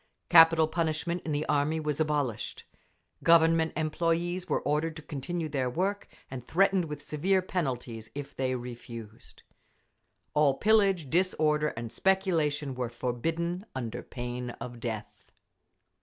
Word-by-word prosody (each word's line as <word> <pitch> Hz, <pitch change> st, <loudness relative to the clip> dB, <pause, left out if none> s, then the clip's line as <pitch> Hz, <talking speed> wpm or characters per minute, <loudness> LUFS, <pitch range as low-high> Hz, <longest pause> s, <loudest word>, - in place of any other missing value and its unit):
Capital 165 Hz, -1 st, +7 dB
punishment 165 Hz, +2 st, -1 dB
in 160 Hz, -, -2 dB
the 150 Hz, +1 st, -1 dB
army 150 Hz, +2 st, +1 dB
was 150 Hz, -1 st, -2 dB
abolished. 145 Hz, -7 st, -1 dB, 0.6 s
Government 165 Hz, -1 st, +5 dB
employees 170 Hz, +3 st, -1 dB
were -, -, +1 dB
ordered 155 Hz, +2 st, 0 dB
to 160 Hz, -, -9 dB
continue 160 Hz, +3 st, -4 dB
their 135 Hz, -4 st, -1 dB
work, 195 Hz, +9 st, -1 dB, 0.2 s
and 125 Hz, -2 st, -7 dB
threatened 190 Hz, 0 st, +3 dB
with 150 Hz, -2 st, -7 dB
severe 185 Hz, +5 st, +1 dB
penalties 125 Hz, -11 st, -3 dB
if 145 Hz, -1 st, -7 dB
they 130 Hz, -1 st, 0 dB
refused. 115 Hz, -3 st, -9 dB, 0.9 s
All 150 Hz, -3 st, +4 dB
pillage, 195 Hz, -8 st, +3 dB
disorder 155 Hz, -4 st, +2 dB
and 115 Hz, -1 st, -5 dB
speculation 160 Hz, -7 st, +1 dB
were 125 Hz, -2 st, -3 dB
forbidden 165 Hz, +10 st, -2 dB
under 120 Hz, -2 st, -4 dB
pain 125 Hz, 0 st, -5 dB
of 120 Hz, -1 st, -7 dB
death. 110 Hz, -3 st, -6 dB
150 Hz, 125 wpm, -29 LUFS, 130-170 Hz, 0.9 s, Capital